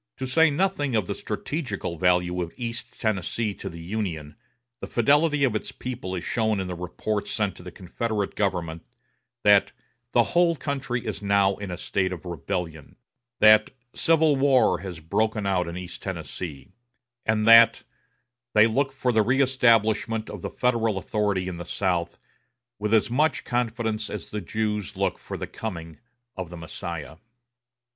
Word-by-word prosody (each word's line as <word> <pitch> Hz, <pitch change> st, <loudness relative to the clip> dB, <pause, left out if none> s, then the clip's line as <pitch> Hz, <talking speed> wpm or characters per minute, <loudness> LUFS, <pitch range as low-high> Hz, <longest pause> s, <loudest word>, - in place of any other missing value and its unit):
To -, -, -3 dB
say 160 Hz, +5 st, +4 dB
nothing 145 Hz, -4 st, 0 dB
of 105 Hz, -4 st, +1 dB
the -, -, -3 dB
strategical 125 Hz, -, -4 dB
value 90 Hz, +1 st, +2 dB
of 85 Hz, -1 st, -5 dB
East 115 Hz, -2 st, -5 dB
Tennessee 110 Hz, +1 st, -1 dB
to -, -, -7 dB
the 85 Hz, -, -10 dB
Union, 85 Hz, -7 st, -4 dB, 0.4 s
the -, -, -6 dB
fidelity 145 Hz, +4 st, +3 dB
of 125 Hz, -5 st, +2 dB
its 110 Hz, -, -3 dB
people 125 Hz, -7 st, -5 dB
is 90 Hz, -, -4 dB
shown 110 Hz, -3 st, 0 dB
in 95 Hz, -, -2 dB
the 90 Hz, -, -4 dB
reports 100 Hz, +4 st, -3 dB
sent 105 Hz, -3 st, -1 dB
to -, -, -11 dB
the 90 Hz, -, -8 dB
Confederate 100 Hz, +3 st, -3 dB
government 85 Hz, -5 st, -2 dB, 0.6 s
that 100 Hz, -1 st, +5 dB, 0.4 s
"the 120 Hz, -, +5 dB
whole 170 Hz, -1 st, +4 dB
country 135 Hz, -5 st, -3 dB
is 105 Hz, -2 st, -4 dB
now 100 Hz, -1 st, +3 dB
in 100 Hz, -2 st, -6 dB
a 90 Hz, -, -4 dB
state 95 Hz, 0 st, -1 dB
of 90 Hz, -1 st, -7 dB
rebellion"; 80 Hz, -1 st, -5 dB, 0.5 s
that 110 Hz, 0 st, +7 dB, 0.2 s
"civil 160 Hz, -2 st, +3 dB
war 135 Hz, -2 st, +3 dB
has 90 Hz, -3 st, -7 dB
broken 110 Hz, +6 st, 0 dB
out 90 Hz, -3 st, +1 dB
in 85 Hz, +1 st, -5 dB
East 90 Hz, -1 st, -7 dB
Tennessee"; 70 Hz, -7 st, -6 dB, 0.5 s
and 110 Hz, 0 st, +1 dB
that 115 Hz, 0 st, +8 dB, 0.7 s
"they 105 Hz, 0 st, +8 dB
look 135 Hz, +5 st, +1 dB
for 130 Hz, -2 st, 0 dB
the 110 Hz, -2 st, +3 dB
reëstablishment 115 Hz, -3 st, +2 dB
of 105 Hz, -, -7 dB
the -, -, -4 dB
Federal 115 Hz, -4 st, +1 dB
authority 100 Hz, -1 st, -1 dB
in 90 Hz, -2 st, -5 dB
the 85 Hz, -, -5 dB
South 90 Hz, -1 st, -1 dB, 0.6 s
with 105 Hz, 0 st, -2 dB
as 110 Hz, +1 st, +3 dB
much 150 Hz, +6 st, +2 dB
confidence 115 Hz, -3 st, -2 dB
as -, -, -7 dB
the 105 Hz, -, -3 dB
Jews 105 Hz, -2 st, -3 dB
look -, -, 0 dB
for -, -, -7 dB
the -, -, -4 dB
coming 85 Hz, -7 st, -7 dB, 0.4 s
of 95 Hz, -3 st, -5 dB
the 90 Hz, -, -8 dB
Messiah." 80 Hz, -1 st, -6 dB
105 Hz, 165 wpm, -25 LUFS, 90-120 Hz, 0.7 s, that